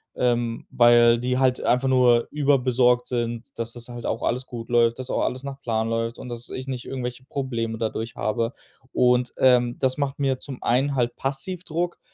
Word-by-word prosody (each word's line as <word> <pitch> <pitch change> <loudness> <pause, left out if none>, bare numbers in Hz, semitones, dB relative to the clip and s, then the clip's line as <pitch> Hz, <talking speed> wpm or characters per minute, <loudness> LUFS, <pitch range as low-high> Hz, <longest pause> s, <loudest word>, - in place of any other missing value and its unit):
ähm, 120 -2 0
weil 120 -1 +6
die 125 +1 0
halt 130 -1 +2
einfach 125 +2 +2
nur 125 -2 +4
überbesorgt 125 -4 +2
sind, 120 -1 -2
dass 115 0 -3
das 120 0 -5
halt 120 -1 -6
auch 115 - -2
alles 125 +2 -1
gut 115 -2 -8
läuft, 115 -1 +3
dass 130 -1 -5
auch - - 0
alles 130 +2 -2
nach 140 0 -7
Plan 110 -3 -1
läuft 115 +1 -2
und - - -8
dass 120 0 -4
ich 130 - -5
nicht 130 -2 -4
irgendwelche 125 -1 -5
Probleme 115 -5 -3
dadurch 115 0 -3
habe. 115 +3 -1 0.4
Und, 125 0 +2
ähm, 125 -2 +3
das 130 0 +1
macht 140 -1 -1
mir 135 -2 0
zum 135 -1 -8
einen 135 +4 +1
halt 120 -2 0
passiv 140 +7 -3
Druck, 175 +1 -3
125 Hz, 195 wpm, -24 LUFS, 120-130 Hz, 0.4 s, weil